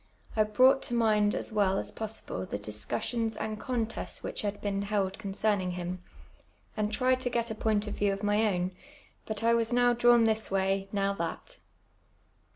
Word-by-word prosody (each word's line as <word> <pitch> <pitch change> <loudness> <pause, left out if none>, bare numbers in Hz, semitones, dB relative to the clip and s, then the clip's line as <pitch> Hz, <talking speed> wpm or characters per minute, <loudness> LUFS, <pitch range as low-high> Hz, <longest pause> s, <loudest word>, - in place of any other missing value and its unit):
I 215 -1 +4
brought 255 +6 +5
to 240 - -2
mind 215 -3 +3
as - - -3
well 200 -3 +2
as - - -1
possible 220 - -4
the - - -3
dis 105 +1 -6
cussions 225 - -1
and 215 0 -3
contests 230 -2 -3
which - - -3
had 205 -1 -3
been 200 -1 -2
held 200 -1 -1
concerning 200 -2 0
him, 180 0 -5 0.7
and 210 0 -1
tried 255 +3 +2
to 255 - -1
get 235 -1 -1
a - - -1
point 215 -1 0
of 210 - -6
view 205 -1 +2
of 195 +1 -4
my 205 +2 +3
own; 180 0 -1 0.6
but 220 0 -4
I 230 0 +4
was 230 0 +2
now 245 0 +4
dra\m 240 -1 +5
this 220 0 +1
way, 195 0 0
now 200 -1 +1
that. 200 - -5
210 Hz, 185 wpm, -29 LUFS, 195-230 Hz, 0.7 s, brought